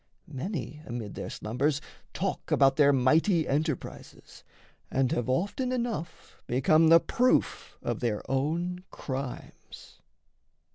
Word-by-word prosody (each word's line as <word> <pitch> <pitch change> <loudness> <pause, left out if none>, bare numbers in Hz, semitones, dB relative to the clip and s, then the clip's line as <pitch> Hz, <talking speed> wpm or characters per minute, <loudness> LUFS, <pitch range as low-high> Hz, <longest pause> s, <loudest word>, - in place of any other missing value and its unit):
Many 150 - -5
amid 115 -4 -5
their - - -6
slumbers 140 +7 -1 0.3
talk - - -3
about 135 -1 +4
Their 145 -1 +5
mighty 155 +6 +3
enterprises, 150 -1 -4 0.5
and 135 -1 +1
have 120 0 -1
often 205 - 0
Enough 235 -10 -4
become 155 +6 +4
the 165 0 +8
proof 250 +8 0
of - - -2
their 115 -4 -1
own 170 +7 -1
crimes. 130 -2 -8
145 Hz, 110 wpm, -28 LUFS, 130-170 Hz, 0.5 s, the